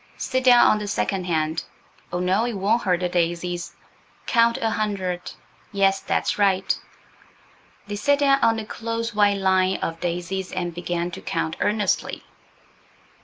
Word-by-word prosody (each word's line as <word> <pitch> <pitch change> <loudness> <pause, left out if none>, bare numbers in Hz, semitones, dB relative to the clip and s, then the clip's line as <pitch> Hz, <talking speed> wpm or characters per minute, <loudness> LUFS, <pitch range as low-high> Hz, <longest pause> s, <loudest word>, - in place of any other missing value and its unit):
Sit 260 -1 -1
down 245 -1 +7
on 215 - +4
the 210 - -5
second 195 -2 -1
hand–oh 160 +1 -4
no, 185 +5 +1
it 240 - -2
won't 205 +5 +1
hurt 180 -2 +1
the 180 - +1
daisies. 175 0 -2 0.5
Count 235 -1 +3
a 225 -1 -1
hundred–yes, 195 -1 -2
that's - - -1
right." 195 -2 +2 1.1
They 205 0 -5
sat 285 +6 +2
down 275 -1 +3
on 225 -1 +4
the 220 - -4
close, 230 +1 -4
white 205 -1 +3
line 190 -1 +2
of 165 0 -4
daisies 180 +2 -3
and 175 -1 -3
began 175 0 -3
to - - -8
count 160 - -2
earnestly. 210 0 0
195 Hz, 145 wpm, -23 LUFS, 175-220 Hz, 1.1 s, down